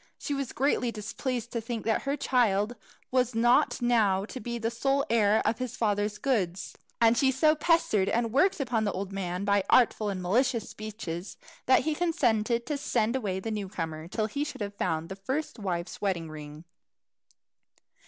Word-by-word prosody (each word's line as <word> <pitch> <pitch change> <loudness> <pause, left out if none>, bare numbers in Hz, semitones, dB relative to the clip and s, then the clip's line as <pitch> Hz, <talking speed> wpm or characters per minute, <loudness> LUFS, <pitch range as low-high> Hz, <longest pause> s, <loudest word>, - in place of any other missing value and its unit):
She 290 - -3
was 275 -2 -3
greatly 255 -3 +1
displeased 235 +3 -4
to 230 - -2
think 230 0 -5
that 220 - +1
her 275 +1 -2
child 240 -5 +1 0.4
was 250 -2 +1
not 240 +2 +3
now 210 -5 +3
to 255 - -7
be 235 +1 -4
the 225 0 -2
sole 270 +4 +1
heir 215 -2 +3
of 230 - +1
his 255 -2 -4
father's 210 -1 0
goods; 190 -9 -1 0.2
and 230 0 +5
she 265 +3 +3
so 305 +4 +4
pestered 300 - +2
and 230 -1 0
worked 370 +8 +3
upon 240 -5 0
the 205 - 0
old 195 0 -4
man 185 0 -3
by 200 -1 +3
artful 220 -4 +4
and 195 -2 -3
malicious 230 +5 +1
speeches, 205 -5 -6 0.3
that 260 - +6
he 310 - 0
consented 235 -9 +1
to 290 +2 -2
send 230 -3 0
away 200 -7 -1
the 225 +4 -4
new 205 -3 -3
comer 160 -4 -5
till 215 +4 -1
he 280 +7 -2
should 300 - -6
have 200 0 -3
found 165 -5 -2
the 190 - -6
first 260 +8 -4
wife's 175 -3 -4
wedding 175 -6 -1
ring. 150 +1 -9
225 Hz, 185 wpm, -28 LUFS, 195-255 Hz, 0.4 s, that